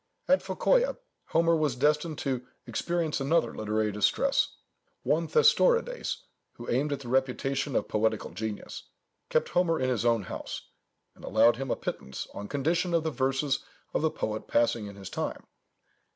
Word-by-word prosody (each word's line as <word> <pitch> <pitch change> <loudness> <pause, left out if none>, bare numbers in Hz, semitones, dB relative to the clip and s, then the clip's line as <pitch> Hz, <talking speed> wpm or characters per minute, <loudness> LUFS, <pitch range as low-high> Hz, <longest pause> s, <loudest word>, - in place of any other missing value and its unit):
At - - +4
Phocœa, - - +2 0.3
Homer 165 0 +3
was 150 -5 +1
destined 150 +3 +1
to 130 -3 -2 0.2
experience 170 -4 -1
another 135 -4 +2
literary 110 0 0
distress. 105 - +2 0.5
One - - +1
Thestorides, 485 +1 +3 0.3
who 120 - -10
aimed 140 +5 +1
at 140 -1 -2
the 125 - -9
reputation 135 +1 0
of - - +1
poetical 110 0 0
genius, 105 +4 -6 0.4
kept - - +1
Homer 175 -2 +2
in 130 - +1
his 115 -3 0
own 115 -3 +3
house, - - -7 0.4
and - - -18
allowed 115 +3 +4
him 135 0 -4
a - - +1
pittance, 65 0 -5
on 100 - -6
condition 165 - 0
of 165 - +2
the 160 - -1
verses 135 +1 0 0.3
of - - +1
the 160 - +3
poet 110 -6 -4
passing 115 -2 +2
in 100 - -9
his 100 -1 -9
name. - - -3
135 Hz, 160 wpm, -29 LUFS, 115-165 Hz, 0.5 s, At